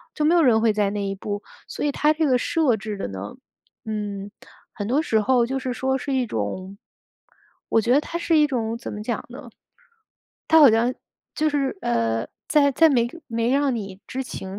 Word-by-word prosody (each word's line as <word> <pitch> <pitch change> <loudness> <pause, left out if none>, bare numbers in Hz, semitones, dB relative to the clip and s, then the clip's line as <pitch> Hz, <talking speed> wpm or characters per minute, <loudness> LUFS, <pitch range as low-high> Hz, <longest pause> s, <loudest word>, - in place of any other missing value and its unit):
就 300 - 0
没 325 - +4
有 345 - +5
人 240 -7 +4
会 225 -2 +3
在 210 -1 +1
意 - - 0
那 200 0 -3
一 195 - -2
步。 205 +1 -5 0.2
所 - - -4
以 290 - +1
它 300 +2 +2
这 315 +1 +1
个 255 -3 +3
设 300 -3 +2
置 210 0 -6
的 - - -4
呢， 95 +2 -7 0.5
嗯， 205 -2 -4 0.4
很 205 0 -5
多 265 +5 +2
时 220 -8 +1
候 245 +1 +3
就 265 +2 -2
是 255 -1 -3
说 265 +1 -1
是 275 +2 -4
一 260 -2 +1
种， 185 - -4 0.9
我 - - +4
觉 240 +3 +2
得 285 - +4
它 335 - -5
是 335 -1 +1
一 300 -1 +5
种 230 -4 -2
怎 235 - -7
么 210 - -6
讲 235 - -3
呢？ - - -10 1.0
它 320 - +6
好 285 -6 +9
像 230 +3 +2 0.4
就 310 0 +1
是， 275 -5 -1
呃， 115 -1 0 0.2
在 285 -2 +4
在 325 +4 +5
没 240 -5 +2 0.2
没 230 +1 -1
让 275 -2 +2
你 195 -3 -7
知 265 +1 -4
情 190 -5 -7
235 Hz, 225 characters per minute, -23 LUFS, 205-280 Hz, 1.0 s, 好